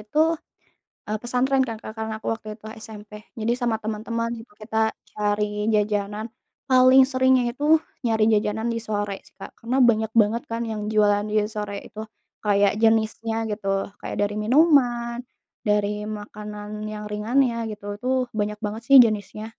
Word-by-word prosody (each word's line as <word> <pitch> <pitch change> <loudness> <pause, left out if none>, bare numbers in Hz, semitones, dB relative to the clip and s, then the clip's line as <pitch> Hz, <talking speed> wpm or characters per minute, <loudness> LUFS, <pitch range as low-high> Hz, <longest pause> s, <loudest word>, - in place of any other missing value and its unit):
itu, 210 +8 -4 0.9
eee, 215 +1 -2
pesantren 260 +2 +1
kan 225 - -4
Kak 215 - -7
karena 220 0 -3
aku - - -11
waktu 220 -1 -11
itu - - -30 0.2
SMP, 210 -1 -11 0.3
jadi 225 +2 0
sama 235 -2 +1
teman-teman 230 +2 -3 0.3
kita 220 +1 -6 0.4
cari 210 0 0 0.3
jajanan, 210 0 0 0.4
paling 255 +1 +7
seringnya 260 -1 +3
itu 285 +4 -5 0.4
nyari 220 -2 +2
jajanan 210 +1 0
di - - -1
sore 205 -1 -2
sih - - -22
Kak. - - -8
Karena 240 +3 -1
banyak 220 -1 +2
banget 220 +3 +1
kan 230 +1 -2
yang 215 -1 -3
jualan 205 -1 +3
di - - -3 0.2
sore 210 -1 -4
itu. 215 - -9 0.5
Kayak 200 -1 +4
jenisnya 225 0 +2 0.2
gitu, 210 -1 -5 0.3
kayak - - -5
dari 205 0 0
minuman, 240 -3 +3 0.5
dari 210 0 0
makanan 210 0 -7
yang 210 0 -6
ringannya 235 +4 +1 0.2
gitu, 210 -1 -9
itu 250 - -8 0.3
banyak 210 0 0
banget 215 +2 -3
sih 275 - +7
jenisnya. 215 -1 -2
215 Hz, 155 wpm, -24 LUFS, 210-235 Hz, 0.9 s, paling